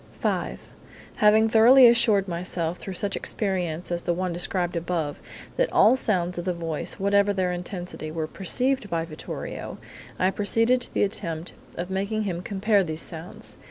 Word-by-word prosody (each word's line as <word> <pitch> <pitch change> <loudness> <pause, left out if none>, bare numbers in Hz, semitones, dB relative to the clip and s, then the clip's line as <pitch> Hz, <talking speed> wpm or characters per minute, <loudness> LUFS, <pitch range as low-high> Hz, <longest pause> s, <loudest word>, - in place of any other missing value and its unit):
"V: - - -1 0.6
Having 215 +1 +5
thoroughly 240 +4 +7
assured 225 -4 +5
myself, 175 -1 -3
through 190 - -7
such 200 +1 -1
experiments 180 -5 -2
as 175 0 -1
the 175 - -1
one 180 0 -2
described 175 0 -1
above, 165 -3 -2 0.4
that - - +1
all - - +6
sounds 180 -8 0
of 175 - -5
the 180 - 0
voice, 165 -3 -3
whatever 200 +1 +2
their 185 -2 0
intensity, 175 -3 -6
were 160 0 -3
perceived 245 +8 -1
by 165 -2 -1
Vittorio, 155 -2 -7 0.4
I 185 +1 +2
proceeded 230 +5 +2
to - - -4
the - - +3
attempt 170 -5 -3 0.2
of 180 +2 -5
making 200 +3 -1
him 180 -4 -3
compare 200 +1 +1
these 160 -2 -3
sounds. 165 +1 -6
185 Hz, 160 wpm, -25 LUFS, 170-210 Hz, 0.6 s, thoroughly